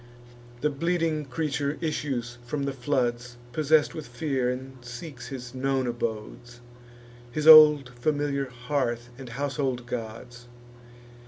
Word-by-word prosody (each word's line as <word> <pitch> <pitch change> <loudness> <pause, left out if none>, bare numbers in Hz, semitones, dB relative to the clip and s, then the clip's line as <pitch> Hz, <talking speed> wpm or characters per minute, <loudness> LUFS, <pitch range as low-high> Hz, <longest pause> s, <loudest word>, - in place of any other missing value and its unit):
The 150 - +1
bleeding 165 0 0
creature 145 +1 -2
issues 130 -7 -3
from 140 +4 -3
the 140 0 -2
floods, 120 -2 -1
Possess'd 155 +3 +3
with 155 -2 -7
fear, 130 -1 -1
and 130 +1 -5
seeks 125 +2 -8
his 125 -3 -7
known 135 0 0
abodes, 120 0 -5 0.7
His 150 +4 -2
old 150 -4 +9
familiar 140 +2 -1
hearth 125 -1 -2
and 130 -2 -8
household 135 -1 -2
gods. 120 +1 -7
130 Hz, 115 wpm, -27 LUFS, 120-145 Hz, 0.7 s, old